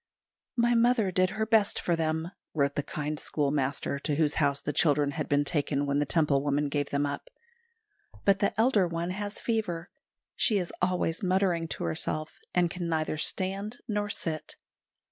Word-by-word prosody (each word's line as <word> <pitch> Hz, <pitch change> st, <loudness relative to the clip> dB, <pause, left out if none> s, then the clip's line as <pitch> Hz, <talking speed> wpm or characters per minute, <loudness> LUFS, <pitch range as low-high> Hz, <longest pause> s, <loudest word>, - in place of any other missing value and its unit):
"My 240 Hz, 0 st, +3 dB
mother 235 Hz, -4 st, +3 dB
did 185 Hz, 0 st, +2 dB
her 220 Hz, +2 st, -2 dB
best 220 Hz, -2 st, +3 dB
for 170 Hz, -, +1 dB
them," 160 Hz, +1 st, -1 dB, 0.2 s
wrote 140 Hz, -2 st, +2 dB
the 145 Hz, -, -1 dB
kind 150 Hz, +1 st, -4 dB
schoolmaster 140 Hz, -2 st, -1 dB
to 150 Hz, 0 st, -1 dB
whose 150 Hz, -1 st, +2 dB
house 140 Hz, -1 st, +2 dB
the 150 Hz, -, -3 dB
children 145 Hz, -2 st, +3 dB
had 155 Hz, 0 st, -4 dB
been 145 Hz, 0 st, +3 dB
taken 145 Hz, -2 st, 0 dB
when 140 Hz, 0 st, +1 dB
the 145 Hz, -, 0 dB
Temple 150 Hz, -4 st, +3 dB
woman 145 Hz, 0 st, 0 dB
gave 145 Hz, 0 st, -1 dB
them 140 Hz, +1 st, 0 dB
up; 140 Hz, 0 st, -5 dB, 1.0 s
"but 195 Hz, -1 st, +4 dB
the 200 Hz, -, +2 dB
elder 220 Hz, -6 st, +4 dB
one 170 Hz, +1 st, -3 dB
has 205 Hz, +2 st, -4 dB
fever. 205 Hz, -7 st, -2 dB, 0.4 s
She 215 Hz, -, +3 dB
is 180 Hz, -3 st, -2 dB
always 180 Hz, -2 st, 0 dB
muttering 185 Hz, -3 st, +1 dB
to -, -, -5 dB
herself, 155 Hz, -, -1 dB
and 175 Hz, -2 st, +2 dB
can 175 Hz, -2 st, -4 dB
neither 155 Hz, -1 st, -1 dB
stand 195 Hz, +7 st, 0 dB
nor 210 Hz, -2 st, -1 dB
sit." 160 Hz, -6 st, -2 dB
165 Hz, 175 wpm, -29 LUFS, 145-195 Hz, 1.0 s, but